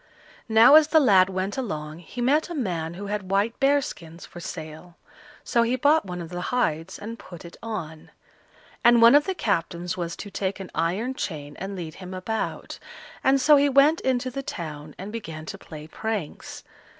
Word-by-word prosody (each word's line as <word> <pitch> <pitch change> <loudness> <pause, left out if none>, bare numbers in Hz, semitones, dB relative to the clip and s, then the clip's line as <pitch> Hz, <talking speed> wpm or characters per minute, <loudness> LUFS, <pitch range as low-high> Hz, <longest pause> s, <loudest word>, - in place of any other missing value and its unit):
Now 225 +4 +7
as 310 0 +8
the 320 0 +5
lad 195 -9 +5
went 190 +5 -3
along 155 -9 -5
he 210 +8 -8
met 295 +7 +2
a 345 - -5
man 170 - -3
who 200 +3 -7
had 200 -2 -4
white 200 +4 0
bear 280 +1 +3
skins 165 -4 -9
for 175 - -11
sale, 165 0 -8 0.5
so 235 - +2
he 235 +2 +1
bought 290 +3 +3
one 180 -1 -5
of 165 - -9
the 175 +1 -5
hides 170 -8 -1
and 225 +3 -8
put 175 -2 -11
it 170 - -11
on; 170 -9 -6 0.7
and 240 0 +6
one 230 +2 +8
of 290 +1 +6
the 380 - -2
captains 175 - -2
was 170 -1 -3
to 205 - -9
take 195 0 -3
an 190 - -8
iron 190 +10 -1
chain 145 - -5
and 195 +1 -5
lead 165 -4 -6
him 185 +2 -9
about, 220 +4 -4 0.4
and 270 +1 +4
so 295 +3 +6
he 285 0 +3
went 280 +4 +4
into 255 -1 0
the 275 - -4
town 155 - -7
and 195 +3 -7
began 165 -9 -7
to - - -7
play 155 -1 -10
pranks. 205 0 -5
195 Hz, 195 wpm, -25 LUFS, 170-245 Hz, 0.7 s, as